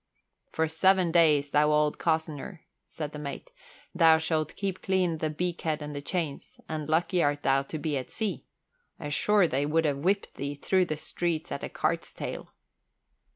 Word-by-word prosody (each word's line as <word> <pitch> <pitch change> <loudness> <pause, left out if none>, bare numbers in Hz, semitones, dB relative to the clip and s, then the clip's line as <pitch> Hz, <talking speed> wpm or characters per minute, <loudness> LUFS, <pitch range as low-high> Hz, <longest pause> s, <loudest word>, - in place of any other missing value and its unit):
"For 160 0 +1
seven 185 +2 +3
days, 150 -4 +4
thou 150 +1 +4
old 150 0 +2
cozzener," 160 +2 -2 0.3
said 150 -2 -5
the 150 - -7
mate, 150 - -7 0.4
"thou 165 -3 +6
shalt 160 -1 -1
keep 195 -2 -3
clean 180 -4 +1
the 155 - 0
beakhead 165 -1 -2
and 150 0 -6
the 145 - -4
chains, 155 -2 -4
and 155 -1 -4
lucky 170 +3 +2
art 145 -1 +1
thou 135 0 +3
to 140 +3 -6
be 150 0 -2
at 130 - -8
sea. 220 -3 -3 0.6
Ashore 175 +6 +2
they 140 0 0
would 160 +2 +2
have 145 -2 +1
whipped 195 +7 0
thee 140 +1 -4
through 185 +5 +2
the 155 -3 -3
streets 170 0 -3
at - - -3
the - - -4
cart's - - -2
tail." - - -6
160 Hz, 175 wpm, -28 LUFS, 150-175 Hz, 0.6 s, thou